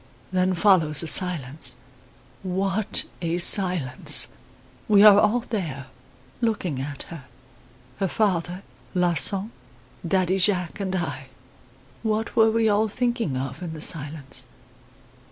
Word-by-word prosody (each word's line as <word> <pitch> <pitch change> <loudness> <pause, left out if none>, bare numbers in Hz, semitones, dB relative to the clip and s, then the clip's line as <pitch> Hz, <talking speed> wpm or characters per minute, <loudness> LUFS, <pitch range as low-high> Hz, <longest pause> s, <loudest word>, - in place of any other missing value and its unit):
"Then 185 0 0
follows 165 -6 +3
a - - -4
silence. 145 -8 +2 0.6
What 195 +2 -1 0.2
a 170 0 -2
silence! 175 -8 +4 0.6
We 205 -1 +5
are 205 -1 +8
all 215 +4 +1
there 160 - -6 0.5
looking 190 - -2
at 140 +1 -7
her 165 -6 -11 0.7
her 195 - 0
father, 180 -2 -2 0.3
Larsan, 180 +4 +3 0.6
Daddy 185 +1 0
Jacques 180 -2 0
and 190 -1 -3
I. 145 -7 -5 0.7
What 220 0 -3
were 225 0 +4
we 225 0 +1
all 215 +1 +1
thinking 235 - -2
of 135 +2 -6
in 170 -3 -6
the - - -9
silence? 150 -3 -2
180 Hz, 120 wpm, -23 LUFS, 155-205 Hz, 0.7 s, are